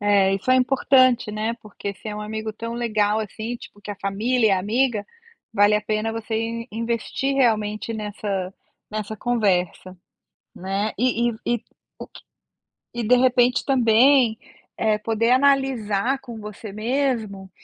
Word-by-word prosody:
É, 200 -2 +3
isso 195 +6 -6
é 255 - +6
importante, 255 -3 +3
né, 220 +2 -2
porque 200 -1 -6
se 205 - -14
é 210 - -4
um - - -5
amigo 220 +1 -4
tão 230 +2 -6
legal, 215 -3 +1
assim, 220 +3 -5
tipo, 205 - -14
que 205 - -8
a 205 - -5
família 215 +3 +1
é - - +3
amiga, 215 +2 0 0.5
vale 205 0 +4
a 210 - +2
pena 215 +1 -2
você 225 0 -3
in 230 +1 -3
investir 230 +4 -2
realmente 220 -4 +1
nessa 205 -3 -4 0.4
nessa 215 0 -4
conversa, 190 -6 0 0.6
né. 195 +3 -2
E 240 -1 +2
e - - -6 0.2
e - - -14 0.3
o - - -7
q - - -15 0.7
e 240 - -2
de 245 +3 +4
repente 250 0 +3
também, 245 -1 +4 0.4
eh, 215 -1 +1
poder 225 +2 0
analisar 260 -3 +2
com 235 -4 -9
você 210 0 -8
mesmo, 220 -4 -2
220 Hz, 155 wpm, -23 LUFS, 210-240 Hz, 0.7 s, é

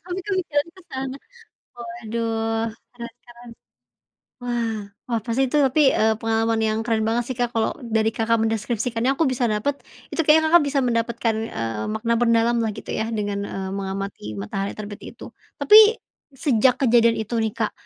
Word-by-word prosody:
Tapi 355 +1 -5
kok 400 - -1
pikirannya 315 0 -2
ke 375 - -15
sana. 265 0 -4 0.6
Waduh, 225 -1 -3 0.3
penasaran. 240 0 -12 1.0
Wah, 235 -3 -2 0.3
wah 230 -2 -1
pasti 235 +3 +1
itu - - +2
tapi, 275 +2 +3
eee, 220 0 +2
pengalaman 225 0 +1
yang 215 0 0
keren 225 -2 0
banget 235 +1 0
sih 255 - -4
Kak 240 0 0
kalau 225 -1 0
dari 220 -1 +1
Kakak 225 0 0
mendeskripsikannya, 225 +3 0
aku 320 +4 +1
bisa 255 -1 -1
dapet, 230 +6 -2 0.3
itu - - -2
kayaknya 315 +1 +5
Kakak 345 -1 +6
bisa 280 -1 0
mendapatkan 230 -2 0 0.2
eee, 115 -2 -3
makna 230 +1 0
mendalam 230 0 +3
lah 220 - -1
gitu - - -11
ya 220 - -1
dengan 205 -2 -2
eee, 190 -1 -5
mengamati 195 - -5
matahari 195 - -3
terbit 205 -1 -8
itu. - - -10 0.3
Tapi 435 +2 +7 0.3
sejak 260 -3 +2
kejadian 235 -2 +4
itu 220 +2 -3
nih 220 -2 0
Kak, - - -2
230 Hz, 165 wpm, -23 LUFS, 220-255 Hz, 1.0 s, Tapi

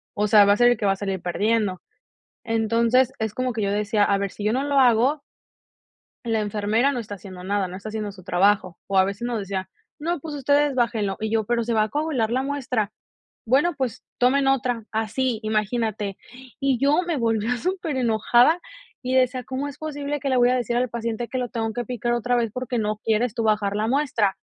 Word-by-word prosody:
o 210 0 +1
sea, 205 -1 +7
va 200 - +5
a - - 0
ser 240 +1 +6
el 245 - +1
que 215 - -2
va 195 - +4
a - - -4
salir 195 -1 -3
perdiendo. 205 0 0 0.6
Entonces, 230 +3 +2
es 220 -2 -2
como 255 +1 -2
que 220 - -3
yo 200 - 0
decía: 210 +1 +1
"A 200 -1 +2
ver, 200 0 -1
si 205 - -8
yo 215 - +2
no 260 - +1
lo 285 -1 +2
hago" 255 +4 +3 1.0
"la 225 -2 0
enfermera 215 +5 +1
no 255 - -3
está 215 -3 -6
haciendo 185 -2 -10
nada, 200 0 0
no 180 - -7
está 200 +3 -8
haciendo 215 -1 -4
su 190 -1 -14
trabajo". 185 0 +2
O 195 -1 +1
a 190 - +6
veces 200 +3 -4
nos 240 -2 -2
decía: 195 -2 -4 0.3
"No, 335 +2 -2
pues 310 +1 -6
ustedes 285 +1 +2
bájenlo", 225 -6 0
y 220 0 -2
yo: 220 -1 +1
"Pero 235 +2 0
se 235 0 -1
va 215 -1 +3
a - - -4
coagular 280 -4 -1
la 255 +2 +1
muestra", 255 -7 -2 0.5
"Bueno, 285 +9 +3
pues, 255 -4 -3
tomen 270 +3 +3
otra", 250 -4 0
así 225 +2 -1
imagínate. 215 -2 -1 0.4
Y 275 -3 +1
yo 290 +5 +3
me 340 -3 -1
volvía 230 -1 0
superenojada, 260 - +2 0.4
y 255 0 -2
decía: 255 -1 +2
"¿Cómo 265 +4 -3
es 285 - -10
posible 290 -1 -4
que 275 - -2
le 260 - +2
voy 245 0 +4
a 255 - +2
decir 240 -1 -1
al 250 0 0
paciente 230 0 -3
que 260 - -3
lo 250 -1 -2
tengo 225 -1 -2
que 240 +2 -3
picar 240 0 -2
otra 240 +1 0
vez, 235 -2 0
porque 250 0 -3
no 215 -1 -1
quieres 225 +1 +1
tú 230 -2 -2
bajar 210 -2 +1
la 215 +1 0
muestra?". 240 -7 +1
230 Hz, 220 wpm, -23 LUFS, 210-255 Hz, 1.0 s, sea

